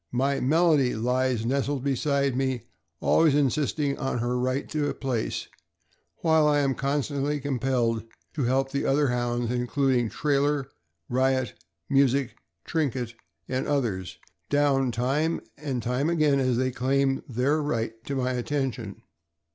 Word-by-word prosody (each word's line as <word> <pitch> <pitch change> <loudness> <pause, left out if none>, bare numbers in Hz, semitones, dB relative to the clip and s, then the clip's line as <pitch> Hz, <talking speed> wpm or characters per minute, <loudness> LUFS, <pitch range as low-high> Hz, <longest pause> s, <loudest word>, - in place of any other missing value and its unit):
My 135 +3 +1
Melody 150 -2 +3
lies 125 0 0
nestled 135 +1 0
beside 140 0 +1
me, 130 -4 -1 0.4
always 160 -3 +4
insisting 145 0 +1
on 135 -2 -1
her 120 +1 -1
right 130 +2 -1
to 150 -2 0
a - - -4
place, 125 -5 -2 0.8
while 160 -2 +4
I 145 -1 +3
am 135 -1 +1
constantly 145 +1 -1
compelled 125 -4 0 0.3
to 140 -5 -1
help 135 +2 +1
the 140 - -1
other 140 0 +2
Hounds, 120 -1 -1
including 125 -1 +1
Trailer, 140 +4 0 0.4
Eiot, 130 0 +1 0.3
Music, 135 -2 +2 0.3
Trinket, 130 -7 -1 0.3
and 130 0 -2
others, 115 -11 -1 0.3
down 140 -3 +2
time 135 +8 0 0.2
and 135 -5 -4
time 125 +6 0
again 155 -4 +3
as 130 -2 +1
they 130 +1 +1
claim 135 +2 +1
their 135 +6 +1
right 115 -6 -1
to 140 - -3
my 130 -1 0
attention. 125 -4 -3
135 Hz, 135 wpm, -26 LUFS, 125-145 Hz, 0.8 s, always